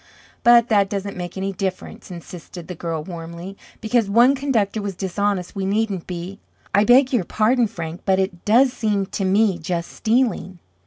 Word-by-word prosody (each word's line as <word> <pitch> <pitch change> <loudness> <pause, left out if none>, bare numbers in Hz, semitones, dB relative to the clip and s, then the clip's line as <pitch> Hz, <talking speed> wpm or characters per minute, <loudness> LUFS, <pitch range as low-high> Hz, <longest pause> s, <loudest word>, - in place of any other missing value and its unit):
"But 235 -1 +6
that 200 -3 +3
doesn't 200 0 -4
make 180 0 -6
any 195 +1 -2
difference," 185 0 -5
insisted 175 -1 -10
the 180 - -5
girl 165 -2 -4
warmly. 170 +2 -8 0.3
"Because 220 -1 +1
one 240 +6 +5
conductor 230 -7 0
was 200 -2 -4
dishonest, 195 0 -2
we 195 - -3
needn't 200 -2 -1
be. 180 +2 -6 0.3
I 205 +1 +4
beg 255 +3 +5
your 235 -7 +2
pardon, 230 +6 +2
Frank, 170 -5 -7
but 190 -1 +2
it 190 -2 -2
does 245 +4 +4
seem 210 -5 0
to 195 - -4
me 195 -1 +2
just 170 +1 -3
stealing." 225 -5 0
195 Hz, 170 wpm, -21 LUFS, 180-220 Hz, 0.3 s, But